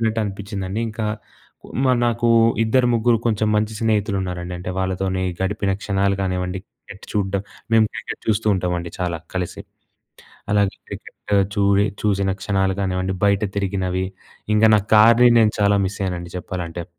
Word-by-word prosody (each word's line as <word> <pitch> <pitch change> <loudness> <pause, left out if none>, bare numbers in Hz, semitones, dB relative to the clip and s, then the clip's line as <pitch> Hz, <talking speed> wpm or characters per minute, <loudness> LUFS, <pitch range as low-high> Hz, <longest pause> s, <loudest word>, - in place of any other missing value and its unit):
ఉనట్టు 115 0 0
అనిపించిందండి. 100 0 -4
ఇంకా 110 0 -4 0.8
మరీ 130 -2 +3
నాకు 120 0 +1 0.4
ఇద్దరు 125 +3 +3
ముగ్గురు 115 0 +3
కొంచెం 110 -1 +1
మంచి 110 +1 0
స్నేహితులున్నారండి. 95 -5 -1
అంటే 90 +1 -5
వాళ్ళతోనే 95 0 -1 0.2
గడిపిన 100 0 0
క్షణాలు 100 -1 +1
కానివ్వండి. 90 0 -2
క్రికెట్ 100 - -14
చూడ్డం 100 -1 -1 0.3
మేము 110 -1 +6
క్రికెట్ - - -6
చూస్తూ 110 0 0
ఉంటామండి 90 -2 -2
చాలా 85 -2 -2 0.2
కలిసి. 90 -2 -3 0.9
అలాగే 100 -2 +2
క్రికెట్ - - -9 0.4
చూ‌ఇ 100 0 +3 0.2
చూసిన 100 -2 +1
క్షణాలు 95 -1 +1
కానివ్వండి 95 0 -1
బయట 100 0 +3
తిరిగినవి 95 -2 -1 0.5
ఇంగ 105 +1 +4
నా 105 - +4
కార్‌ని 115 +3 +7
నేను 110 -1 +3
చాలా 100 0 +4
మిస్ 95 - -4
అయ్యానండి 90 -2 -3
చెప్పాలంటే. 85 -1 -5
100 Hz, 140 wpm, -21 LUFS, 95-105 Hz, 0.9 s, కార్‌ని